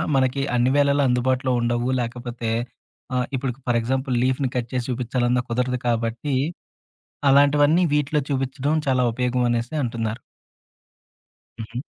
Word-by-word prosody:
మనకి 130 +1 +2
అన్ని 125 +2 +3
వేళల 140 0 +3
అందుబాటులో 130 +1 +1
ఉండవు. 120 +1 0
లేకపోతే 120 -1 -4 0.7
ఆహ్, 125 - +1
ఇప్పుడుకు 130 -1 -3
ఫర్ 120 -1 +3
ఎగ్జాంపుల్ 130 +1 -1
లీఫ్‌ని 130 +1 +1
కట్ 120 -2 -2
చేసి 125 -1 -1
చూపిచ్చాలన్నా 125 0 0
కుదరదు 125 +1 0
కాబట్టి 115 +4 -1 0.9
అలాంటివన్నీ 145 +4 +5
వీటిలో 150 +1 +1
చూపించడం 135 +2 -1
చాలా 130 -1 +3
ఉపయోగమనేసి 120 +1 0
అంటున్నారు. 115 -1 -3 1.4
హుహు. 115 +2 -6
125 Hz, 115 wpm, -23 LUFS, 120-135 Hz, 1.4 s, అలాంటివన్నీ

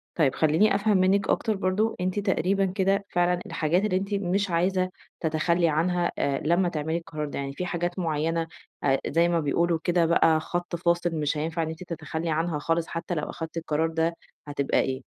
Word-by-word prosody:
طيب 145 -6 +2
خلّيني 160 +7 +3
أفهم 205 0 +3
منِك 195 +2 +2
أكتر 220 -2 +1
برضه، 195 +4 0
أنتِ 185 +3 0
تقريبًا 195 0 +1
كده 195 +1 +1
فعلًا 175 0 +2
الحاجات 170 +6 0
اللي 185 -3 +1
أنتِ 195 +2 -3
مش 195 0 0
عايزة 185 +2 +1 0.3
تتخلي 165 +1 +1
عنها 175 +3 +1
آآ 140 -1 0
لمّا 175 +2 +3
تعملي 160 +1 -2
القرار 155 -3 -5
ده، - - -5
يعني 140 0 -4
في 180 - -4
حاجات 175 +1 -2
مُعيّنة، 165 0 0 0.4
آآ 135 -1 +3
زي 170 +3 +3
ما 170 -1 +2
بيقولوا 165 +3 +1
كده 175 -1 +2
بقى 160 -1 +4
خط 175 +1 -3
فاصل 170 0 +1
مش 150 -1 -1
هينفع 165 +2 -1
إن 160 - -3
أنتِ 160 +3 -7
تتخلي 160 -1 -4
عنها 160 -1 0
خالص 165 +1 0
حتى 170 +1 -4
لو 150 - -3
أخدتِ 165 0 -6
القرار 160 0 0
ده 165 +1 0 0.3
هتبقى 140 -1 0
إيه؟ 130 0 -1
170 Hz, 190 wpm, -26 LUFS, 160-185 Hz, 0.4 s, بقى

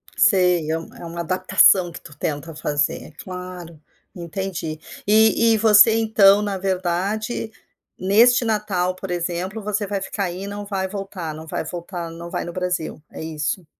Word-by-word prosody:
Sei, 180 -5 +3
é 160 - +1
uma 165 - -10
é - - -9
uma 170 +1 -7
adaptação 185 0 +4
que - - -9
tu 145 - -13
tenta 150 +2 -4
fazer, 145 -1 -1
é - - -13
claro, 180 0 -9 0.4
entendi. 170 -2 -5 0.3
E 220 +2 +5
e - - +3
você 220 +1 +7
então 210 -3 +5
na 205 -2 -2
verdade, 195 +5 -2 0.5
neste 230 +6 +5
Natal 200 -5 0
por 185 0 -7
exemplo 180 +4 -3
você 210 0 -1
vai 200 0 -3
ficar 195 +1 -3
aí 180 +1 -5
e - - -5
não 205 0 -6
vai 195 -2 -2
voltar 195 -4 -6
não 160 +1 -9
vai - - -3
voltar, 170 +1 -6
não 170 +1 -8
vai - - -3
no 175 - -7
Brasil, 180 -4 -3
é - - -7
isso? 160 +2 -3
185 Hz, 175 wpm, -22 LUFS, 170-205 Hz, 0.5 s, você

